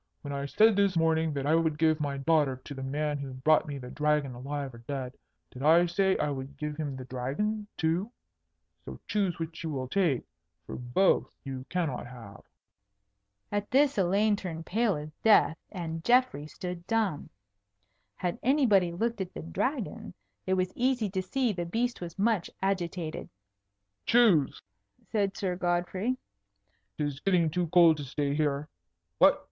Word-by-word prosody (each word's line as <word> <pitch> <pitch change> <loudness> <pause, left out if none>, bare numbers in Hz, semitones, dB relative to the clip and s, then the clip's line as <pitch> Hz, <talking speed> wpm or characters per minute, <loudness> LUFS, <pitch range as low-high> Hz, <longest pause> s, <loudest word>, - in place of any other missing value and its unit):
When 140 - -5
I 140 0 -3
said 220 +8 +5
this 200 -3 +2
morning 160 -1 +2
that 140 -1 -3
I 150 - +3
would 160 -2 +2
give 160 0 +3
my 145 -2 -2
daughter 145 -1 +2
to 145 - -8
the 135 - -7
man 145 +2 -2
who 135 -2 -6
brought 150 +5 +3
me 145 -1 -4
the 125 -2 -8
Dragon 150 -3 +1
alive 135 +2 -5
or 120 - -11
dead, 130 +1 -5 0.4
did 125 - -10
I 165 +4 +6
say 190 +2 +2
I 150 - 0
would 135 0 -6
give 150 +1 -4
him 145 -3 -4
the 130 -1 -7
Dragon 145 - -2
too? 175 +7 0 0.7
So - - -9
choose 195 -5 0
which 165 0 -6
you 165 - -3
will 130 -4 -3
take, 155 -4 +1 0.4
for - - -7
both 125 +11 +2
you 130 -1 -6
cannot 160 -9 -2
have." 115 -5 -11 1.1
At 205 0 -2
this 280 +2 +4
Elaine 200 +3 +3
turned 165 -5 -6
pale 225 -1 +1
as 150 +1 -7
death, 210 -7 +5 0.2
and 165 -4 -5
Geoffrey 245 - +3
stood 180 +2 -7
dumb. 215 -9 0 0.9
Had 180 -1 -3
anybody 225 - +3
looked 225 +5 -2
at 185 - -5
the 75 - -6
Dragon, 80 0 -3 0.3
it 190 - +2
was 185 0 -1
easy 245 -5 +1
to 190 -1 -1
see 240 +4 0
the 175 -2 -3
beast 235 +8 -2
was 170 0 -7
much 210 -3 +1
agitated. 175 -4 -2 0.8
"Choose!" 215 - +4 0.5
said 200 -3 0
Sir 185 -2 -1
Godfrey. 180 +7 -1 0.8
"'Tis 145 -2 -2
getting 175 -4 +2
too 175 +1 0
cold 165 -1 +6
to 145 - -5
stay 140 +1 -2
here. 145 -1 0 0.5
What? - - +6
165 Hz, 165 wpm, -29 LUFS, 145-195 Hz, 1.1 s, I